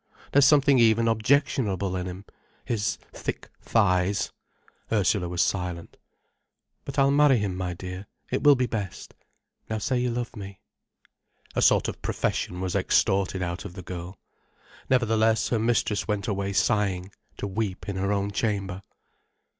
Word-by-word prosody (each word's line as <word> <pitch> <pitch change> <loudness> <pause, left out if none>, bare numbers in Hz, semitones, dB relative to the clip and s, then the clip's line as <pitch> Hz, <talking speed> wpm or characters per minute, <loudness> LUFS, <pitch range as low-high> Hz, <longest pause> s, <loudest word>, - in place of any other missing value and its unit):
There's 140 0 +6
something 140 -2 +5
even 115 0 +4
objectionable 110 -5 +1
in 90 0 -3
him—his 100 +3 -5 0.2
thick - - -5
thighs—" 100 -2 +1 0.6
Ursula 100 -4 +1
was 90 0 +1
silent. 90 -3 -3 0.9
"But 140 - -6
I'll 135 0 +4
marry 145 -2 +5
him, 100 -4 -2
my 90 -1 -3
dear—it 95 +8 -6
will 145 -1 +8
be 125 -1 +1
best. 105 -6 -5 0.6
Now 110 - -1
say 125 +4 0
you 125 0 0
love 120 +1 -4
me." 100 -2 -8 1.0
A - - +1
sort - - +4
of - - -6
profession 90 0 -2
was 95 -1 -2
extorted 95 -1 +2
out 85 -1 -4
of - - -8
the 95 -1 -9
girl. 90 +2 -7 0.7
Nevertheless 115 -3 +2
her 115 - +1
mistress 110 -2 0
went 105 -2 -1
away 100 -1 -1
sighing, 100 -4 +1 0.3
to - - -4
weep 100 -1 -3
in 100 -2 -3
her 100 +1 0
own 100 0 0
chamber. 100 -3 -2
100 Hz, 145 wpm, -26 LUFS, 95-115 Hz, 1.0 s, will